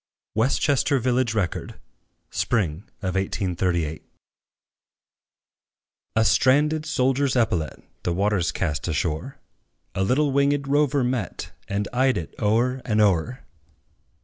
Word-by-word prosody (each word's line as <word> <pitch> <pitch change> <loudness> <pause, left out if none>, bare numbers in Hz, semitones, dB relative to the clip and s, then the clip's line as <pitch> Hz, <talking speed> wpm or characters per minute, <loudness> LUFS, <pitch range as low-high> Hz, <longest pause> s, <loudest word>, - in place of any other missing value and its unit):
WESTCHESTER 135 +4 +2
VILLAGE 125 -2 +1
RECORD. 95 -6 -2 0.6
Spring 95 -6 -1 0.2
of 95 -1 -1
1838. 90 -4 -1 2.1
A 110 0 +3
stranded 150 +6 +3
soldier's 135 +1 +1
epaulet, 90 -10 0 0.2
The 90 - -1
waters 95 -1 +1
cast 75 -5 -2
ashore, 80 - -2 0.6
A 95 - 0
little 140 +8 +2
winged 140 +1 +2
rover 145 -1 +2
met, 120 -5 -3 0.2
And 100 +1 -2
eyed 130 +1 +2
it 85 - -5
o'er 120 +5 +2
and 110 -2 0
o'er. 105 +5 +1
110 Hz, 105 wpm, -24 LUFS, 90-130 Hz, 2.1 s, A